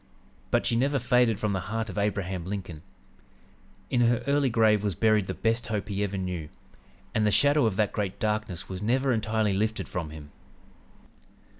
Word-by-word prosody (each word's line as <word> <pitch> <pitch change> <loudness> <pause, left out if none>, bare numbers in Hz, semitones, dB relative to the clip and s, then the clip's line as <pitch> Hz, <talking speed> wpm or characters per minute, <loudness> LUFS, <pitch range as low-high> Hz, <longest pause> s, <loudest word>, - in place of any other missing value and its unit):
But - - +1
she 115 - +1
never 140 +4 +2
faded 125 -3 +2
from 105 -2 0
the 95 - 0
heart 115 0 -2
of 100 - -7
Abraham 95 -3 -1
Lincoln.... 90 -4 -6 1.1
In 120 - +2
her 120 0 +2
early 140 -1 +2
grave 110 -3 +3
was 100 -4 -1
buried 110 -2 +2
the - - -3
best 115 +1 0
hope 105 -1 -3
he 100 0 -1
ever 100 -1 -2
knew, 90 -5 -4 0.6
and 110 -2 +1
the 105 - +3
shadow 145 +3 +4
of 105 - -1
that 105 0 +1
great 100 -3 -2
darkness 105 -4 -2
was 95 0 -6
never 130 +5 +1
entirely 110 -2 0
lifted 110 +3 -1
from 85 -4 -4
him. 75 -1 -11
105 Hz, 180 wpm, -27 LUFS, 95-115 Hz, 1.1 s, shadow